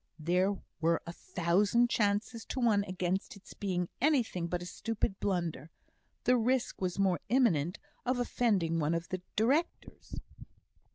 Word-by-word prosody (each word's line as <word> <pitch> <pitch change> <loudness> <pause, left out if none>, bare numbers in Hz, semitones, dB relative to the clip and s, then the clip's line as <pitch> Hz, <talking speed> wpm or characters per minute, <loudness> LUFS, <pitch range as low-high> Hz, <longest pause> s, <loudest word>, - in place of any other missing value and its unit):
There 180 +5 +1 0.2
were 165 +1 +2
a 170 - -6
thousand 195 +9 +2
chances 210 +2 0
to - - -4
one 220 -5 +3
against 185 +1 -2
its 200 0 -13
being 180 -3 -2
anything 245 - +2
but 175 0 -3
a - - -7
stupid 200 +1 -2
blunder; 170 -6 -2 0.5
the 250 0 +4
risk 245 0 0
was 180 -1 -1
more 190 -3 +2
imminent 190 - +2 0.3
of 255 0 0
offending 205 -9 +1
one 155 +2 +1
of 170 +1 -4
the 185 -1 -3
directors. 275 +10 -1
195 Hz, 145 wpm, -32 LUFS, 175-230 Hz, 0.5 s, the